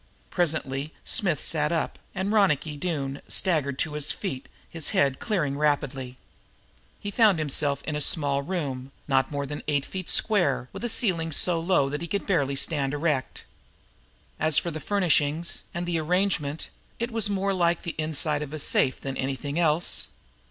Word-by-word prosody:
Presently 155 Hz, -4 st, -1 dB
Smith 180 Hz, -, +2 dB
sat 150 Hz, -1 st, +1 dB
up, 165 Hz, -, -1 dB, 0.2 s
and 190 Hz, +2 st, -1 dB
Ronicky 165 Hz, -8 st, +2 dB
Doone 145 Hz, -4 st, -3 dB
staggered 150 Hz, -8 st, +1 dB
to 155 Hz, +1 st, -1 dB
his 150 Hz, 0 st, -1 dB
feet, 135 Hz, -10 st, -5 dB, 0.2 s
his 165 Hz, -2 st, -4 dB
head 135 Hz, -2 st, +3 dB
clearing 150 Hz, -, -1 dB
rapidly. 135 Hz, -4 st, -1 dB, 0.8 s
He 205 Hz, -, -5 dB
found 210 Hz, -4 st, +4 dB
himself 145 Hz, -2 st, +1 dB
in 155 Hz, -, -3 dB
a 150 Hz, -, -1 dB
small 140 Hz, -2 st, +4 dB
room, 140 Hz, -5 st, -4 dB, 0.2 s
not 135 Hz, -2 st, +2 dB
more 140 Hz, -1 st, -3 dB
than 145 Hz, +1 st, -5 dB
eight 145 Hz, -2 st, +1 dB
feet 185 Hz, -2 st, -5 dB
square, 175 Hz, -, +2 dB
with -, -, -7 dB
a 240 Hz, -, -1 dB
ceiling 185 Hz, -8 st, +1 dB
so 170 Hz, +3 st, +2 dB
low 165 Hz, -5 st, +2 dB
that 150 Hz, +3 st, -4 dB
he 170 Hz, -, -4 dB
could 200 Hz, +3 st, -2 dB
barely 140 Hz, -8 st, +1 dB
stand 140 Hz, 0 st, -1 dB
erect. 145 Hz, -3 st, -1 dB, 1.0 s
As 155 Hz, -1 st, +2 dB
for 170 Hz, -, +1 dB
the 155 Hz, -, -5 dB
furnishings 170 Hz, -4 st, +1 dB
and 175 Hz, +1 st, -3 dB
the 175 Hz, -2 st, 0 dB
arrangement, 160 Hz, -3 st, -1 dB, 0.3 s
it 235 Hz, +1 st, -3 dB
was 225 Hz, -2 st, +2 dB
more 195 Hz, 0 st, 0 dB
like 175 Hz, -2 st, +1 dB
the 170 Hz, -, -3 dB
inside 155 Hz, -1 st, +1 dB
of 150 Hz, 0 st, -6 dB
a -, -, -3 dB
safe 135 Hz, -2 st, +3 dB
than 135 Hz, -1 st, -5 dB
anything 140 Hz, +4 st, -3 dB
else. 165 Hz, 0 st, +2 dB
155 Hz, 170 wpm, -26 LUFS, 140-175 Hz, 1.0 s, found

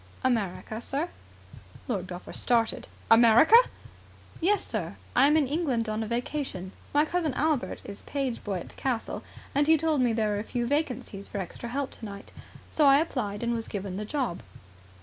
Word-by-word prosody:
"America, 220 Hz, -2 st, -1 dB
sir." 290 Hz, +8 st, -2 dB, 0.8 s
Lord 195 Hz, -8 st, -2 dB
Belpher 180 Hz, 0 st, -8 dB
started. 230 Hz, -2 st, +1 dB, 0.2 s
"America!" 235 Hz, -, +7 dB, 0.8 s
"Yes, 400 Hz, +5 st, +2 dB
sir. -, -, -3 dB, 0.2 s
I 265 Hz, +3 st, +6 dB
am 300 Hz, +2 st, +4 dB
in 305 Hz, -, +3 dB
England 270 Hz, -6 st, 0 dB
on 215 Hz, +1 st, -1 dB
a 220 Hz, -, -3 dB
vacation. 235 Hz, -5 st, -3 dB, 0.2 s
My 295 Hz, +1 st, +4 dB
cousin, 320 Hz, -5 st, -1 dB
Albert, 305 Hz, -3 st, 0 dB
is 200 Hz, -, -9 dB
page 270 Hz, -4 st, -3 dB
boy 195 Hz, -4 st, -2 dB
at -, -, -10 dB
the -, -, -16 dB
castle, 250 Hz, -4 st, -2 dB, 0.3 s
and 290 Hz, +1 st, +2 dB
he 320 Hz, 0 st, +6 dB
told 310 Hz, -2 st, +1 dB
me 245 Hz, -2 st, +3 dB
there 220 Hz, -1 st, +1 dB
were 205 Hz, -1 st, 0 dB
a -, -, -3 dB
few 240 Hz, +1 st, -2 dB
vacancies 250 Hz, -8 st, -2 dB
for -, -, -6 dB
extra 195 Hz, +5 st, -5 dB
help 275 Hz, +2 st, -2 dB
tonight, 200 Hz, -3 st, -8 dB, 0.4 s
so 300 Hz, -2 st, +4 dB
I 275 Hz, 0 st, +8 dB
applied 240 Hz, -9 st, -1 dB
and 235 Hz, 0 st, +1 dB
was 230 Hz, -1 st, -3 dB
given 195 Hz, -2 st, -4 dB
the 210 Hz, -, -3 dB
job." 250 Hz, -6 st, -2 dB
240 Hz, 180 wpm, -28 LUFS, 215-290 Hz, 0.8 s, I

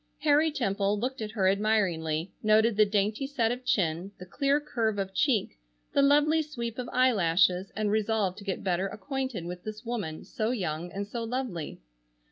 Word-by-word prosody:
Harry 300 Hz, +1 st, +4 dB
Temple 205 Hz, -6 st, 0 dB
looked 255 Hz, +2 st, -3 dB
at 215 Hz, -, -3 dB
her 205 Hz, -4 st, +1 dB
admiringly, 190 Hz, -5 st, +1 dB
noted 215 Hz, +1 st, +4 dB
the 215 Hz, 0 st, +5 dB
dainty 210 Hz, +5 st, 0 dB
set 235 Hz, -5 st, 0 dB
of 250 Hz, +1 st, -4 dB
chin, 185 Hz, -6 st, 0 dB
the 180 Hz, -, -9 dB
clear 275 Hz, +9 st, +1 dB
curve 230 Hz, -7 st, -1 dB
of 195 Hz, -1 st, -3 dB
cheek, 235 Hz, -, +1 dB, 0.3 s
the -, -, +4 dB
lovely 295 Hz, +3 st, +4 dB
sweep 240 Hz, -6 st, -5 dB
of 245 Hz, -, -4 dB
eyelashes, 190 Hz, -6 st, +3 dB
and 210 Hz, -1 st, 0 dB
resolved 215 Hz, -3 st, 0 dB
to -, -, -10 dB
get 195 Hz, -2 st, -3 dB
better 185 Hz, 0 st, 0 dB
acquainted 260 Hz, -, -4 dB
with 180 Hz, +1 st, -7 dB
this 215 Hz, +2 st, -7 dB
woman, 210 Hz, -10 st, -4 dB
so 225 Hz, -4 st, -2 dB
young 175 Hz, -7 st, -3 dB
and 200 Hz, +1 st, -4 dB
so 230 Hz, +3 st, -5 dB
lovely. 230 Hz, -, -4 dB
215 Hz, 175 wpm, -28 LUFS, 190-250 Hz, 0.3 s, the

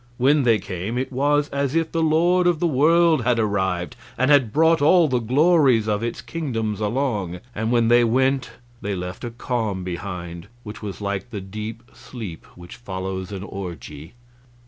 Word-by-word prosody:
When 140 Hz, +4 st, +4 dB
they 115 Hz, -4 st, +4 dB
came 95 Hz, +4 st, -5 dB
it 130 Hz, +2 st, -2 dB
was 145 Hz, +2 st, +2 dB
as 140 Hz, +1 st, -2 dB
if 165 Hz, -1 st, +1 dB
the 165 Hz, -, 0 dB
lord 175 Hz, +3 st, +3 dB
of 175 Hz, -3 st, +2 dB
the 175 Hz, -, +1 dB
world 160 Hz, 0 st, +4 dB
had 120 Hz, 0 st, +2 dB
arrived, 95 Hz, -5 st, -1 dB, 0.2 s
and 130 Hz, +3 st, +2 dB
had 130 Hz, -7 st, +4 dB
brought 160 Hz, +3 st, +3 dB
all 165 Hz, +3 st, +5 dB
the 130 Hz, -3 st, +1 dB
glories 130 Hz, -2 st, +3 dB
of 105 Hz, 0 st, 0 dB
its 115 Hz, 0 st, -4 dB
kingdoms 115 Hz, -10 st, -3 dB
along; 105 Hz, -6 st, -1 dB
and 110 Hz, +1 st, -2 dB
when 120 Hz, -2 st, +3 dB
they 120 Hz, +1 st, +5 dB
went 130 Hz, +2 st, +1 dB, 0.3 s
they 100 Hz, 0 st, -2 dB
left 90 Hz, +3 st, -6 dB
a 120 Hz, -, -3 dB
calm 115 Hz, -5 st, -3 dB
behind 90 Hz, -1 st, -6 dB, 0.2 s
which 105 Hz, 0 st, -9 dB
was 105 Hz, -1 st, -6 dB
like 100 Hz, +3 st, -3 dB
the 105 Hz, -4 st, -5 dB
deep 105 Hz, +4 st, -7 dB
sleep 105 Hz, -, -9 dB
which 90 Hz, 0 st, -12 dB
follows 95 Hz, -3 st, -5 dB
an 95 Hz, -1 st, -6 dB
orgy. 85 Hz, -, -8 dB
115 Hz, 175 wpm, -22 LUFS, 100-140 Hz, 0.3 s, all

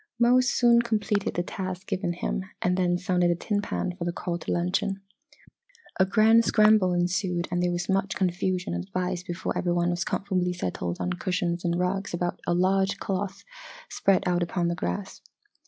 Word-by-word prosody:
Mose 245 Hz, +1 st, +4 dB
soon 235 Hz, -1 st, +5 dB
completed 210 Hz, -3 st, -1 dB
the 175 Hz, -, 0 dB
task 185 Hz, 0 st, -5 dB
given 180 Hz, -2 st, -2 dB
him 180 Hz, +2 st, -3 dB, 0.2 s
and 180 Hz, 0 st, +1 dB
then 175 Hz, -1 st, +1 dB
sounded 180 Hz, -1 st, +1 dB
a 175 Hz, -, +2 dB
tin 205 Hz, +4 st, -1 dB
pan 185 Hz, -3 st, -3 dB
for 180 Hz, -, -5 dB
the 175 Hz, -, -1 dB
call 170 Hz, 0 st, -4 dB
to -, -, -5 dB
luncheon. 185 Hz, +3 st, 0 dB, 1.0 s
A 190 Hz, -, +4 dB
grand 225 Hz, +3 st, +5 dB
scramble 215 Hz, -4 st, +4 dB
ensued 175 Hz, 0 st, 0 dB
and 175 Hz, 0 st, 0 dB
there 180 Hz, -, +1 dB
was 175 Hz, 0 st, -2 dB
much 195 Hz, 0 st, 0 dB
confusion 180 Hz, -, -1 dB
and 85 Hz, 0 st, -2 dB
advice 180 Hz, -, -2 dB
before 175 Hz, 0 st, -4 dB
every 175 Hz, -1 st, 0 dB
one 175 Hz, 0 st, +1 dB
was 175 Hz, 0 st, -1 dB
comfortably 185 Hz, -3 st, -1 dB
settled 90 Hz, -, -3 dB
on 180 Hz, -, -1 dB
cushions 180 Hz, -1 st, -2 dB
and 170 Hz, 0 st, 0 dB
rugs 185 Hz, +1 st, -1 dB
about 175 Hz, 0 st, -2 dB
a 175 Hz, -, +2 dB
large 190 Hz, +2 st, +2 dB
cloth 195 Hz, 0 st, -3 dB, 0.5 s
spread 195 Hz, -2 st, +2 dB
out 175 Hz, 0 st, +1 dB
upon 175 Hz, 0 st, 0 dB
the 170 Hz, -, -1 dB
grass. 90 Hz, -, -4 dB
180 Hz, 185 wpm, -26 LUFS, 175-195 Hz, 1.0 s, soon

